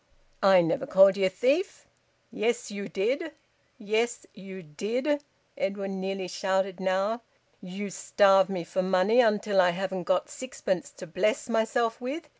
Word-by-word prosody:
"I 190 -3 +6
never 165 - -1
called 195 +1 +6
ye 195 -1 +1
a - - +3
thief." 275 - 0 0.5
"Yes, 235 +1 -2
you 200 0 -6
did! 265 - -2 0.4
Yes, 230 +1 -1
you 190 -2 -11
did!" 245 - -2 0.3
Edwin 195 0 -3
nearly 190 -1 -3
shouted 190 +1 -1
now. 195 +5 0 0.4
"You 195 +1 -6
starve 195 +1 +3
me 185 -3 -3
for 185 +2 -2
money, 185 +5 +2
until 210 -3 +2
I 180 - +4
haven't 190 0 -3
got 180 0 +1
sixpence 190 -8 -4
to 185 - -10
bless 185 +6 -1
myself 230 +1 0
with. 300 +5 -5
195 Hz, 145 wpm, -27 LUFS, 190-230 Hz, 0.5 s, I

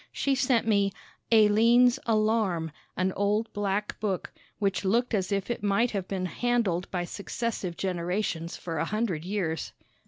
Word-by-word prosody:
She 275 - 0
sent 255 -3 +2
me 200 -2 +3 0.4
"Alleine's 230 +4 +5
Alarm," 215 -7 +1 0.3
an 185 0 +1
old 210 +3 0
black 205 0 -2
book, 200 -4 -2 0.2
which 200 -2 0
looked 235 +6 +1
as 195 -2 0
if 200 +3 -1
it 240 - -3
might 205 +4 +2
have 195 -3 -3
been 190 -2 -2
handled 205 -4 0
by 175 -2 -2
successive 200 -2 -4
generations 180 -2 -2
for 165 -3 -4
a 165 - +1
hundred 210 -6 -1
years. 180 -6 -2
200 Hz, 150 wpm, -28 LUFS, 185-225 Hz, 0.4 s, Alleine's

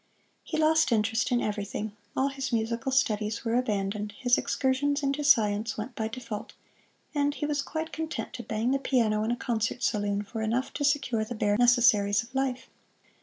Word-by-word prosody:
He - - -4
lost 310 -2 +3
interest 225 +1 +1
in 245 -1 +2
everything. 205 0 -3 0.3
All 270 +1 +2
his 270 -1 -4
musical 230 +2 -1
studies 215 -3 0
were 225 - 0
abandoned, 210 -3 -1
his 245 -2 +3
excursions 285 +2 0
into 275 +2 0
science 220 -5 +3
went 220 +4 -5
by 220 -1 -2
default, 230 -2 -6 0.6
and 290 -1 +1
he - - -2
was 295 -1 0
quite 315 +3 -5
content 320 0 -4
to 245 - -5
bang 225 +1 -1
the 275 - +2
piano 225 -6 +1
in 220 - -1
a 240 - +1
concert 235 0 -2
saloon 205 -2 0
for 220 +2 -6
enough 235 +4 -1
to 290 - -3
secure 275 -6 +1
the 235 +2 -6
bare 205 -1 +1
necessaries 230 -3 +4
of 245 +3 -16
life. 265 -1 -1
240 Hz, 180 wpm, -28 LUFS, 215-270 Hz, 0.6 s, necessaries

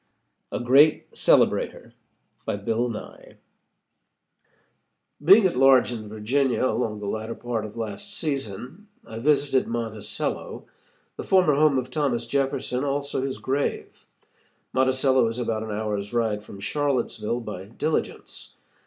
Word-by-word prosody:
A - - -2
GREAT 135 +5 +4
CELEBRATOR - - +2 0.5
BY - - 0
BILL 115 +4 -1
NYE 110 - -9 1.9
Being 195 +6 +7
at 180 - +2
large 130 -1 +5
in 110 -3 -6
Virginia, 125 +5 0
along 115 -3 0
in 105 - -8
the - - -5
latter 110 +3 -4
part 120 -3 -3
of 105 +2 -10
last 115 - -6
season, 140 - -4 0.2
I 115 - -8
visited 140 0 +2
Monticello, 115 -2 -4 0.5
the - - -5
former 185 -6 +4
home 145 -1 +4
of 130 0 -3
Thomas 135 -5 0
Jefferson, 135 -2 -1
also 140 -1 -1
his 135 0 -3
grave. 140 +2 -3 0.7
Monticello 130 -1 +3
is 115 +1 -3
about 115 -3 -2
an 110 - -6
hour's 105 0 -3
ride 110 -3 0
from 100 -2 -12
Charlottesville, 125 -2 -1
by 105 -4 -7
diligence. 150 +9 -4
125 Hz, 130 wpm, -25 LUFS, 110-140 Hz, 1.9 s, Being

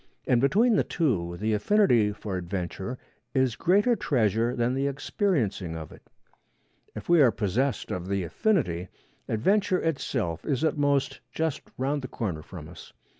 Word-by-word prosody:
And 120 -2 +3
between 210 - +4
the - - +3
two 90 - -1
the 110 +3 0
affinity 120 - +3
for 105 -1 -5
adventure 95 +5 -4 0.4
is 130 -4 +2
greater 205 +7 +3
treasure 115 - +1
than 120 0 +1
the 135 +1 0
experiencing 130 - -1
of 80 -2 -8
it. - - -14 0.9
If - - -7
we 170 -2 +5
are 130 - +7
possessed 115 +4 -1
of 90 0 -4
the 100 -1 -1
affinity, 90 - 0 0.4
adventure 190 - +2
itself 125 - -2
is, 140 -1 -1
at 160 - +2
most, 140 -2 +1
just 160 -3 -1 0.2
round 140 +3 -1
the 130 - -5
corner 95 -11 -4
from 80 -1 -10
us. 85 -1 -13
125 Hz, 155 wpm, -27 LUFS, 95-150 Hz, 0.9 s, are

